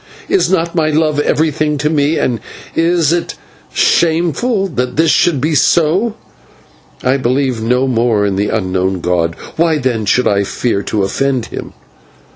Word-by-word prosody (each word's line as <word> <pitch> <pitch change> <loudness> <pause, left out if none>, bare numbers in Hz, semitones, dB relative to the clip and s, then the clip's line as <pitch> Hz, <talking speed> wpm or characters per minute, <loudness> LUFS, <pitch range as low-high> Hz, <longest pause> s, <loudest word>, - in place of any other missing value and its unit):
Is 390 - +2
not 170 -2 0
my 160 -3 +1
love 155 -1 +1
everything 150 0 0
to 150 +2 -1
me, 150 0 +1
and 120 -3 0 0.4
is 165 -1 +2
it 175 - -2 0.4
shameful 175 - +1
that 125 -7 -3
this 160 0 +3
should 165 -6 +2
be 155 +4 0
so? 170 - +2 0.9
I 130 +2 +2
believe 130 -2 0
no 125 +4 +1
more 115 -4 +1
in 100 -1 -1
this 100 +2 0
unknown 95 -3 -1
god; 85 -1 0 0.2
why, 165 -1 +2
then, 125 -6 -1
should 125 +5 +2
I 100 0 +2
fear 100 +1 -1
to 100 0 -2
offend 130 +5 -1
him? - - -8
140 Hz, 155 wpm, -15 LUFS, 115-160 Hz, 0.9 s, this